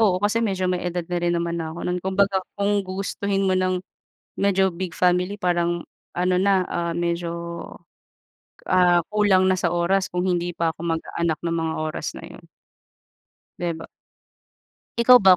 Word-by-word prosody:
oo, 200 -5 +4
kasi 205 +4 +1
medyo 195 -5 0
may 180 -1 0
edad 175 0 -3
na 175 +1 -2
rin 175 0 +1
naman 170 0 -1
na 160 - -3
ako 165 +2 -6
nun. 180 0 -1
Kung 190 +1 -3
baga, 200 -1 +3 0.2
kung 200 0 +2
gugustuhin 195 +1 -2
mo 190 - +2
ng, 185 0 0 0.6
medyo 195 -1 +3
big 170 -1 -5
family 180 +2 +2
parang, 175 -2 0 0.3
ano 180 +1 +2
na, 190 -1 +3
ah, 170 -1 -2
medyo 170 0 -1 1.4
ah, 175 -2 +4
kulang 205 -3 +4
na 185 - +4
sa 180 -2 +1
oras 175 +3 +1
kung 180 +1 -1
hindi 175 -1 -1
pa 165 -1 +1
ako - - -12 0.2
magkaanak 160 0 -2
ng 165 - 0
mga 160 0 -1
oras 155 0 -3
na - - -8
yun. - - -12 1.2
'Di 175 -1 -1
ba? 160 0 -8 1.1
Ikaw 245 +1 +8
ba, 190 -2 +7
180 Hz, 170 wpm, -23 LUFS, 170-190 Hz, 1.4 s, Ikaw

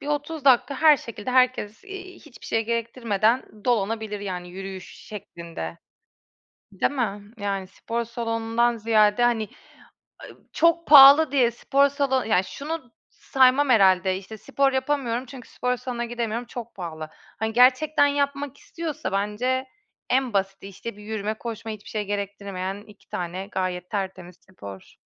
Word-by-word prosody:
bir - - -9
30 295 0 -3
dakika 270 +1 +4
her 305 0 +6
şekilde 230 0 -7
herkes, 255 - +1
eee, 390 -2 -9
hiçbir 300 -8 -15
şey 225 0 0
gerektirmeden 230 0 0 0.2
dolanabilir, 220 -2 -1
yani, 180 -3 -5
yürüyüş 190 0 -8
şeklinde. 170 - -8 0.9
Değil 195 +8 0
mi? 210 -5 -3
Yani, 200 -2 -3
spor 230 +5 -4
salonundan 230 0 -1
ziyade, 220 +1 +3
hani, 225 -3 +1 0.8
ııı, - - -22
çok 335 +1 +2
pahalı 285 +1 +9
diye 250 -4 +3
spor 275 +4 +2
salonu 275 -3 0
Ya, 190 -4 +3
şunu 280 - -6 0.2
saymam 265 +2 +3
herhâlde, 190 -4 +4
işte: 200 +3 -10
"Spor 275 +5 +1
yapamıyorum 260 -2 -1
çünkü 255 -1 -12
spor 250 0 -1
salonuna 245 -1 -4
gidemiyorum, 235 0 -3
çok 235 -1 -8
pahalı." 160 -4 -6 0.3
Hani, 220 +1 -2
gerçekten 265 +5 +4
yapmak 280 -1 -2
istiyorsa 310 - -5
bence 210 +7 -1 0.4
en 255 -2 +1
basiti, 195 0 -2
işte, 200 +2 -8
bir 210 - -12
yürüme, 215 0 -3
koşma, 225 0 -6
hiçbir 210 -1 -10
şey 210 -1 -3
gerektirmeyen 200 -1 -4
2 210 -1 -19
tane 180 +2 -4
gayet 180 -1 -3
tertemiz 190 -3 -5
spor. 100 - -11
230 Hz, 140 wpm, -24 LUFS, 200-265 Hz, 0.9 s, pahalı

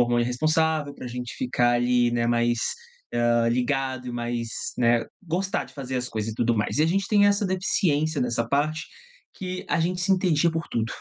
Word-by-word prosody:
hormônio 120 0 +3
responsável 155 +3 +1
pra 125 - -7
gente 125 0 -6
ficar 125 -1 +1
ali, 120 0 +3
né, 120 -1 +1
mais, 120 0 +2 0.5
eh, 120 -1 +2
ligado 130 +1 -1
e - - -5
mais, 120 -1 -3 0.3
né 120 -1 +3 0.2
gostar 185 +2 -1
de - - -16
fazer 130 -2 -4
as 125 0 -2
coisas 110 -1 -3
e - - -9
tudo 120 +1 +1
mais. 105 +6 -1
E - - +5
a - - +4
gente 195 +4 +1
tem 205 -1 +5
essa 205 0 +2
deficiência 160 -5 +1
nessa 120 -2 0
parte, 155 +4 0 0.5
que 185 -1 -5
a - - +1
gente 180 +2 0
se 185 +2 0
entendia 175 -3 +2
por 165 0 -3
tudo, 115 0 -1
130 Hz, 195 wpm, -25 LUFS, 120-165 Hz, 0.5 s, E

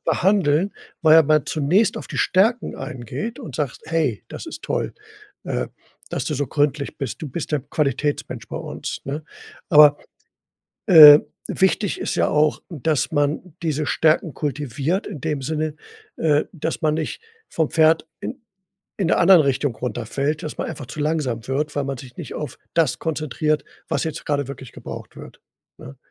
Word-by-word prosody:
behandeln, 185 -1 +2 0.3
weil 160 -1 +7
ja 165 - +8
man 155 -1 +3
zunächst 175 +8 +2
auf - - -8
die - - -6
Stärken 225 +6 +2
eingeht 135 - -6
und 145 - -8
sagst: 145 -6 -3
„Hey, 155 -10 -1
das - - -8
ist 320 -1 -8
toll, - - -2 0.5
äh, - - -2 0.4
dass - - -2
du 155 - -2
so 145 +1 -1
gründlich 145 +1 -1
bist. 135 -6 -4
Du 155 - -4
bist 155 +3 -5
der 150 - +1
Qualitätsmensch 145 +1 -2
bei - - -5
uns, - - -5
ne?“ 145 +3 -4 0.5
Aber, 150 -1 +7 0.9
äh, 150 -5 +11 0.3
wichtig 190 +1 +1
ist - - -2
ja - - +2
auch, 150 0 +2
dass 155 -3 -1
man 145 +3 -1
diese 155 -2 -1
Stärken 155 +1 +2
kultiviert 145 - -2
in 180 -8 -7
dem 150 -3 -2
Sinne, 155 +2 -2 0.4
äh, 150 -2 +2
dass 165 -1 -4
man 155 -1 +2
nicht 155 - -4 0.3
vom 160 -2 0
Pferd 160 0 +3
in 255 - -6 0.6
in 185 - 0
der - - +3
anderen 175 -2 +7
Richtung 135 -2 0
runterfällt, 125 +6 -2
dass 155 - -6
man - - -2
einfach 135 - -7
zu 135 +5 -7
langsam 145 -7 -1
wird, 150 +2 -2
weil 145 - 0
man 135 -2 -4
sich 125 -1 -12
nicht - - -7
auf 145 -3 -6 0.2
das 160 -7 +2
konzentriert, 155 -1 -1 0.3
was - - 0
jetzt 160 -2 -5
grade 145 -2 -1
wirklich 135 -2 -9
gebraucht - - -9
wird, - - -12 0.4
ne? 70 - -11
150 Hz, 170 wpm, -22 LUFS, 140-160 Hz, 0.9 s, äh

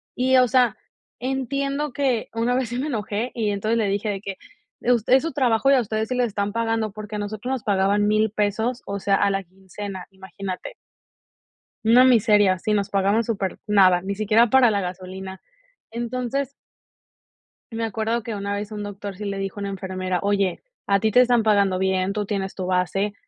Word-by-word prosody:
Y, 260 +1 +3
o 250 -1 +5
sea, 245 -2 +3 0.4
entiendo 275 +3 -2
que 255 -4 0
una 230 +2 0
vez 255 -3 -1
sí 240 - -4
me 285 - -2
enojé, 220 -1 -3
y 220 -3 0
entonces 215 +3 0
le 215 - +1
dije 205 +2 -1
de 195 -1 -3
que: 195 -2 -6 0.4
"Eh, 245 - +2
us 230 - 0
es 260 +3 +5
su 330 - -2
trabajo, 260 -1 +2
y - - +6
a 255 - +4
ustedes 220 +1 -2
sí 255 - -1
les 250 -1 +2
están 200 -1 -3
pagando", 225 -1 -1
porque 215 +1 -8
a - - -3
nosotros 215 +4 -4
nos 265 -3 -2
pagaban 205 +1 +2
$1000 215 +1 +2
pesos, 220 +4 -1
o 200 0 -4
sea, 195 0 +2
a 200 - +2
la 195 0 -1
quincena, 190 +1 -8
imagínate. 190 - -7 1.1
Una 235 +3 +6
miseria 210 -6 +4
si 215 +2 -1
nos 200 -1 +1
pagaban 200 +3 +2
súper 195 -4 -3
nada, 190 -4 +5
ni 195 +2 -4
siquiera 215 +3 +3
para 255 -2 +5
la 200 -1 0
gasolina. 185 +1 -7 0.5
Entonces 250 +3 -3 1.2
me 225 0 -2
acuerdo 225 +2 -1
que 225 -1 -5
una 200 0 -3
vez 205 +1 -4
un 210 -1 -5
doctor 205 -1 -7
sí 210 - -7
le 200 -1 -3
dijo 195 +1 -4
a - - -4
una 200 - -3
enfermera: 185 -2 -3
"Oye, 200 -2 0 0.2
a 200 0 +3
ti 220 +1 +2
te 250 - +5
están 245 -2 +4
pagando 200 -3 +3
bien, 190 0 0
tú 210 0 -2
tienes 195 -2 -3
tu 185 - -4
base, 185 +3 0
210 Hz, 200 wpm, -23 LUFS, 195-235 Hz, 1.2 s, y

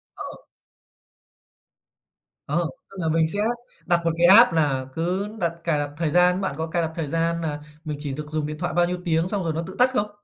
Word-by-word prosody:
Ờ. - - -8 2.1
Ờ, 170 +4 +1 0.3
tức 195 - -14
là 165 - 0
mình 160 0 +3
sẽ 200 +5 -4 0.5
đặt 175 -2 +3
một 165 - +2
cái 170 +1 +5
app 205 +5 +8
nà 140 -5 +1
cứ 180 +5 -1
đặt 170 -2 +1
cài 165 -3 +1
đặt 145 0 -2
thời 165 -1 0
gian. 180 +3 +4
Bạn 190 -8 -2
có 160 - -1
cài 170 +1 -1
đặt 160 - -1
thời 160 -3 -3
gian 165 +2 0
nà 150 -3 -3 0.2
mình 150 -2 -4
chỉ 145 -2 -3
được 150 0 -5
dùng 155 -1 -1
điện 150 0 -5
thoại 175 +2 -2
bao 175 0 +4
nhiêu 180 +1 -2
tiếng 165 0 +1
xong 200 -1 -1
rồi 165 - 0
nó 160 +2 -2
tự 190 +2 -9
tắt 250 +1 +5
không? 210 -4 0
165 Hz, 230 wpm, -24 LUFS, 155-180 Hz, 2.1 s, app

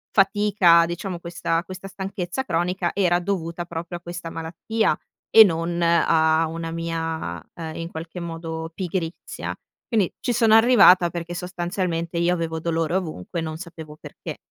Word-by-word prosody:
fatica 195 -4 +5
diciamo 175 +1 -4
questa 170 -1 -2
questa 185 +2 -8
stanchezza 190 +4 -4
cronica 175 0 0
era 175 -3 +2
dovuta 175 -2 -3
proprio 170 +1 -5
a - - -17
questa 175 0 -6
malattia 165 +8 -1 0.4
e 220 - +12
non 170 -2 0
a 165 -1 +3
una 165 +1 -5
mia, 165 - -3
ehm, 160 -2 -6
in 165 0 -5
qualche 165 +2 -7
modo 165 -1 -5
pigrizia. 175 -2 -4 0.3
Quindi 215 -7 +1
ci - - 0
sono 225 -1 +5
arrivata 225 -7 +7
perché 170 0 -5
sostanzialmente 175 -1 -3
io 170 +1 +2
avevo 165 -2 -2
dolore 165 +1 -1
ovunque 170 - -3
non 160 -1 -4
sapevo 160 -3 -10
perché. - - -8
170 Hz, 145 wpm, -23 LUFS, 165-185 Hz, 0.4 s, e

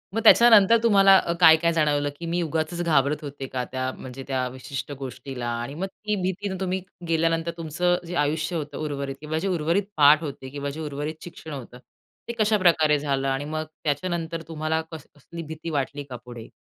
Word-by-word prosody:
मग 225 - +1
त्याच्यानंतर 230 -1 +7
तुम्हाला 195 -4 +7
अ, 170 - -2
काय, 160 -2 +9
काय 170 +1 +1
जाणवलं? 145 -2 +1
की 170 - -6
मी 175 +1 0
उगाचच 160 +2 -2
घाबरत 150 -3 +1
होते 140 -2 -6
का? 125 -1 -3
त्या 130 0 -2
म्हणजे 130 +1 -8
त्या 130 -2 -1
विशिष्ट 130 +3 -6
गोष्टीला? 130 -1 -6
आणि 130 +4 -6
मग 190 +5 -3
ती 210 +2 -4
भीतीनं 190 +1 -2
तुम्ही 190 0 -1 0.3
गेल्यानंतर 165 0 +1
तुमचं 170 +2 0
जे 175 - -5
आयुष्य 155 +2 0
होतं 150 -3 -4
उर्वरित 140 -2 -4
किंवा 155 +1 -3
जे 195 - -2
उर्वरित 175 +2 +1
पाठ 150 +2 +6
होते 135 -3 -6
किंवा 140 +1 -4
जे 145 +3 -7
उर्वरित 150 +1 -5
शिक्षण 165 -2 -9
होतं 125 -3 -8 0.5
ते - - -1
कशाप्रकारे 175 -8 +4
झालं? 135 -2 -1
आणि 135 +1 -1
मग 155 +1 -3 0.2
त्याच्यानंतर 165 +2 -2
तुम्हाला 160 0 -1
कस 160 -3 -9
कसली 165 +4 -9
भीती 160 +1 -7
वाटली 145 -1 -2
का 125 - -6
पुढे? 120 -2 -10
155 Hz, 190 wpm, -25 LUFS, 140-170 Hz, 0.5 s, काय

